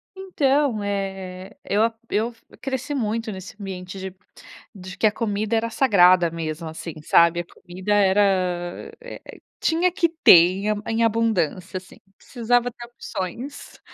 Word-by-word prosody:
Então, 285 Hz, -, 0 dB
eh, 195 Hz, -1 st, -5 dB
eu 210 Hz, +2 st, +1 dB
a 230 Hz, 0 st, +1 dB, 0.2 s
eu 225 Hz, +3 st, 0 dB
f 230 Hz, -, -25 dB, 0.2 s
cresci 270 Hz, +1 st, -3 dB
muito 225 Hz, -2 st, -2 dB
nesse 190 Hz, +1 st, -9 dB
ambiente 190 Hz, -1 st, -7 dB
de 190 Hz, -1 st, -7 dB, 0.6 s
de 185 Hz, -3 st, -10 dB
que 220 Hz, -, +4 dB
a -, -, +2 dB
comida 210 Hz, 0 st, -2 dB
era 225 Hz, +1 st, 0 dB
sagrada 185 Hz, -8 st, +4 dB
mesmo, 160 Hz, 0 st, -5 dB
assim, 160 Hz, +1 st, -7 dB
sabe. 170 Hz, +2 st, +4 dB
A -, -, -11 dB
comida 185 Hz, +3 st, -4 dB
era, 190 Hz, -3 st, +1 dB
eh -, -, -10 dB
eh, -, -, -12 dB, 0.2 s
tinha 345 Hz, +2 st, +2 dB
que 345 Hz, -3 st, +1 dB
ter -, -, +9 dB
em 185 Hz, +5 st, +2 dB
a -, -, 0 dB
em 225 Hz, +1 st, 0 dB
abundância, 200 Hz, -5 st, 0 dB
assim. 185 Hz, -, -12 dB, 0.2 s
Precisava 245 Hz, 0 st, 0 dB
ter 240 Hz, 0 st, -10 dB
opções. 235 Hz, +3 st, -7 dB
205 Hz, 155 wpm, -23 LUFS, 185-235 Hz, 0.6 s, ter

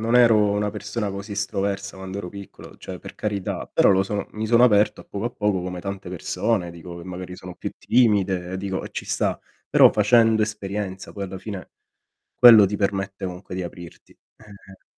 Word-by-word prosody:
non 115 Hz, +2 st, 0 dB
ero 115 Hz, -3 st, +6 dB
una 105 Hz, 0 st, 0 dB
persona 105 Hz, +1 st, -4 dB
così 100 Hz, +2 st, -7 dB
estroversa 100 Hz, -1 st, -2 dB
quando 95 Hz, 0 st, -7 dB
ero 100 Hz, -3 st, -5 dB
piccolo, 100 Hz, -2 st, -12 dB
cioè -, -, -8 dB
per -, -, -11 dB
carità, 100 Hz, -3 st, -3 dB
però -, -, +4 dB
lo 95 Hz, -1 st, +4 dB
son 100 Hz, +1 st, -3 dB
mi 110 Hz, +1 st, -4 dB
sono 120 Hz, +2 st, +5 dB
aperto 105 Hz, -2 st, +3 dB
a -, -, -27 dB
poco 100 Hz, +1 st, -6 dB
a -, -, -3 dB
poco 105 Hz, -6 st, 0 dB
come 90 Hz, 0 st, -5 dB
tante 100 Hz, -1 st, -6 dB
persone, 90 Hz, +2 st, -1 dB
dico, 85 Hz, +1 st, -10 dB
che 85 Hz, -, -9 dB
magari 90 Hz, 0 st, -7 dB
sono 90 Hz, 0 st, -9 dB
più -, -, -5 dB
timide, 95 Hz, -6 st, +1 dB
dico, 95 Hz, 0 st, -4 dB
e -, -, -6 dB
ci -, -, -5 dB
sta. -, -, -1 dB, 0.3 s
Però -, -, +7 dB
facendo 110 Hz, +1 st, +4 dB
esperienza, 100 Hz, -2 st, -4 dB
poi 100 Hz, -, -5 dB
alla 95 Hz, 0 st, -7 dB
fine, 95 Hz, -3 st, -8 dB, 0.6 s
quello 115 Hz, -5 st, +9 dB
ti 105 Hz, +2 st, -3 dB
permette 100 Hz, -1 st, -2 dB
comunque 90 Hz, +1 st, -6 dB
di 95 Hz, -, -3 dB
aprirti. 85 Hz, -1 st, -10 dB, 0.2 s
Eh-eh 100 Hz, -3 st, -16 dB
100 Hz, 190 wpm, -23 LUFS, 95-105 Hz, 0.6 s, quello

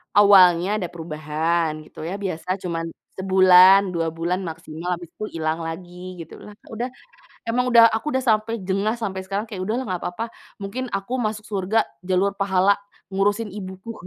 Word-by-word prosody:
Awalnya 190 Hz, -2 st, +6 dB
ada 180 Hz, -5 st, -3 dB
perubahan, 155 Hz, 0 st, -2 dB
gitu -, -, -10 dB
ya, 185 Hz, +5 st, -4 dB
biasa 185 Hz, 0 st, -3 dB
cuman 170 Hz, -3 st, -3 dB, 0.3 s
sebulan, 190 Hz, 0 st, +6 dB
2 165 Hz, -1 st, 0 dB
bulan 170 Hz, +3 st, -2 dB
maksimal, 165 Hz, 0 st, -6 dB
habis 175 Hz, -, -10 dB
itu -, -, -7 dB, 0.2 s
ilang 160 Hz, +1 st, -1 dB
lagi 180 Hz, +2 st, -7 dB
gitu, 165 Hz, -1 st, -9 dB
lah 210 Hz, -, -11 dB, 0.2 s
udah. 240 Hz, +3 st, -4 dB, 0.6 s
Emang 250 Hz, +2 st, +1 dB
udah 230 Hz, -1 st, +9 dB
aku 295 Hz, +7 st, -2 dB
udah 260 Hz, -1 st, 0 dB
sampai 220 Hz, +1 st, +1 dB
jengah, 205 Hz, +4 st, 0 dB
sampai 190 Hz, -4 st, -3 dB
sekarang 200 Hz, +4 st, -3 dB
kayak 195 Hz, -4 st, -5 dB
udahlah 235 Hz, +6 st, -2 dB
enggak 185 Hz, -2 st, -3 dB
apa-apa, 180 Hz, +6 st, -3 dB, 0.3 s
mungkin 240 Hz, +6 st, -5 dB
aku 195 Hz, +6 st, -3 dB
masuk 215 Hz, -3 st, -2 dB
surga 205 Hz, +2 st, 0 dB, 0.2 s
jalur 190 Hz, +2 st, +1 dB
pahala, 195 Hz, 0 st, +3 dB, 0.3 s
ngurusin 205 Hz, +3 st, 0 dB
ibuku. 190 Hz, +3 st, -7 dB
190 Hz, 160 wpm, -23 LUFS, 175-210 Hz, 0.6 s, udah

